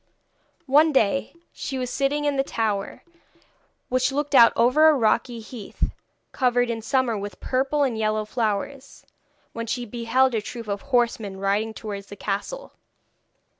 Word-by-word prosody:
One 300 +3 +5
day, 270 +3 +1 0.2
she 270 - -5
was 250 -1 -3
sitting 290 +2 0
in 290 -1 +1
the 270 - +2
tower, 215 -6 -2 0.8
which 255 +1 +1
looked 290 +1 -2
out 235 -4 +8
over 255 +7 +5
a 310 - +4
rocky 235 0 +1
heath, 220 -2 -5 0.4
covered 245 -2 +1
in 225 -1 -4
summer 250 0 +1
with 200 -2 -6
purple 270 +3 0
and 255 -4 0
yellow 215 -1 0
flowers, 245 +5 -3 0.5
when 230 0 -5
she 245 +2 -2
beheld 240 +3 +1
a 220 - 0
troop 230 +2 -8
of 200 -1 -3
horsemen 235 -7 0
riding 205 +3 0
towards 200 -2 -6
the 205 - -9
castle. 205 - -4
240 Hz, 150 wpm, -24 LUFS, 215-270 Hz, 0.8 s, out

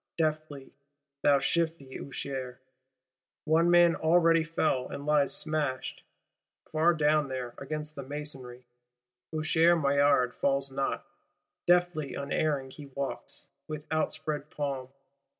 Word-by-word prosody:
Deftly, 155 -3 -2 0.5
thou 145 -1 +5
shifty 150 -1 -1
Usher: 130 -2 -5 0.9
one 165 +2 +4
man 175 -1 +6
already 165 0 +4
fell; 160 -5 0
and 140 - -6
lies 150 -2 +3
smashed, 150 -4 -2 0.7
far 165 +2 +3
down 150 -1 +3
there, 130 -2 -4
against 150 +2 -4
the 140 - -5
masonry! 130 -3 -7 0.7
Usher 160 +2 +3
Maillard 140 -4 +3
falls 135 0 +1
not: 135 0 -2 0.6
deftly, 175 -4 +2
unerring 140 -1 -1
he 145 +1 -10
walks, 140 0 -5 0.2
with 155 -1 -6
outspread 155 -1 -1
palm. 140 -4 -3
150 Hz, 110 wpm, -29 LUFS, 135-155 Hz, 0.9 s, man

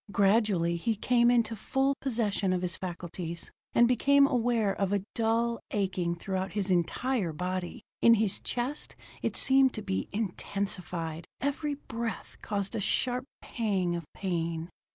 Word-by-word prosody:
Gradually 195 -4 +3
he 225 +6 0
came 240 +3 +3
into 230 -2 +3
full 270 +6 +1
possession 215 -7 0
of 180 0 -1
his 175 -1 +1
faculties 175 -1 -5 0.2
and 235 - +6
became 280 +3 +5
aware 235 -6 +2
of 195 -1 -1
a 200 -2 +1
dull 230 0 +1
aching 185 -4 -1
throughout 190 +2 -3
his 200 -2 -1
entire 185 +3 +1
body. 180 +4 -4 0.2
In 230 0 +7
his 215 -3 0
chest 250 +5 -3 0.3
it - - -1
seemed 265 -1 +5
to 215 - -4
be 95 0 -2
intensified; 180 -5 -3
every 285 +2 -1
breath 230 -4 -5
caused 200 -2 -2
a - - -1
sharp 250 +5 0 0.2
pang 195 -7 0
of 170 - -4
pain. 170 -3 -2
205 Hz, 145 wpm, -29 LUFS, 180-235 Hz, 0.3 s, In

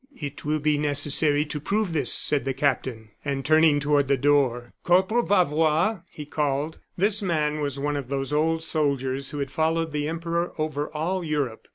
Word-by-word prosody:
"It 145 -1 -7
will 150 +1 0
be 150 0 0
necessary 145 0 +2
to 150 0 -5
prove 200 +3 -1
this," 155 - +2
said 145 -2 +4
the 135 -1 -3
captain. 125 -6 -2
And 140 -2 -3
turning 155 -1 +4
toward 145 -1 +1
the 140 0 +2
door: 130 -3 +1
"Corporal 190 +7 +3
Bavois!" 165 0 +2
he 150 - -9
called. 150 +1 -2 0.2
This 205 +3 +2
man 155 -5 0
was 140 -2 -2
one 145 +1 -2
of 140 -3 -4
those 135 +1 -3
old 160 +2 +1
soldiers 140 -4 -1
who 145 - -6
had 140 -2 -3
followed 160 +1 0
the 150 0 -2
Emperor 170 +1 -2
over 155 -1 -2
all 175 +4 -2
Europe. 145 -7 -3
150 Hz, 180 wpm, -25 LUFS, 140-160 Hz, 0.2 s, said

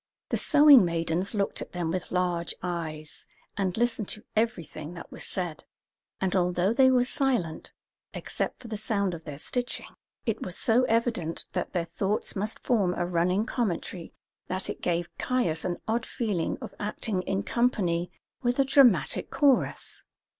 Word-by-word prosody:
The - - +1
sewing 290 -5 +7
maidens 170 +3 -1
looked 200 -1 0
at - - -8
them 175 -2 -1
with 180 0 -3
large 175 -2 -1
eyes, 160 -4 -5 0.3
and 190 -1 -1
listened 230 -3 +1
to 215 - -3
everything 170 -8 -2
that 170 - -10
was - - -7
said; 175 -5 -4 0.6
and 190 -1 0
although 180 +2 +2
they 260 +1 +6
were 250 -1 +4
silent, 250 - -1 0.4
except - - -3
for 245 - -10
the 220 -2 -4
sound 200 -3 0
of 165 -1 -8
their 145 -3 -6
stitching, 245 - -2 0.4
it 225 - -1
was 180 - -4
so 245 +1 +4
evident 225 -8 0
that - - -2
their 175 -2 0
thoughts 195 +5 -1
must 210 +2 -2
form 200 -7 +2
a 175 - 0
running 180 +4 +1
commentary 185 -7 -3 0.4
that 185 +1 -1
it - - -9
gave 170 -1 -1
Caius 180 -12 0
an 175 -1 -1
odd 230 +1 0
feeling 205 -8 -1
of - - -7
acting 205 -1 -2
in 195 +2 -1
company 180 -8 +1 0.3
with 245 -1 +1
a 275 - +4
dramatic 245 - +4
chorus. 280 -4 +1
190 Hz, 160 wpm, -28 LUFS, 170-235 Hz, 0.6 s, sewing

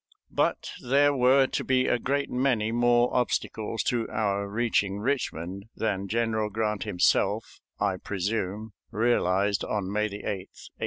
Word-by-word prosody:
But - - 0
there 140 +3 +3
were 130 +1 +5
to - - -2
be 130 -1 +2
a 120 - +1
great 140 +3 0
many 125 -4 +1
more 120 +1 +3
obstacles 115 -2 -1
to 120 -2 -1
our 100 -2 -1
reaching 105 -3 0
Richmond 100 - -2
than 100 -3 -1
General 110 0 0
Grant 105 -1 -2
himself, 90 0 +1 0.2
I 100 -2 0
presume, 105 +2 -3 0.2
realized 100 -3 +1
on 100 -3 -2
May 105 +1 +1
8, - - -2
1864. 100 -2 -7
110 Hz, 140 wpm, -27 LUFS, 100-120 Hz, 0.2 s, were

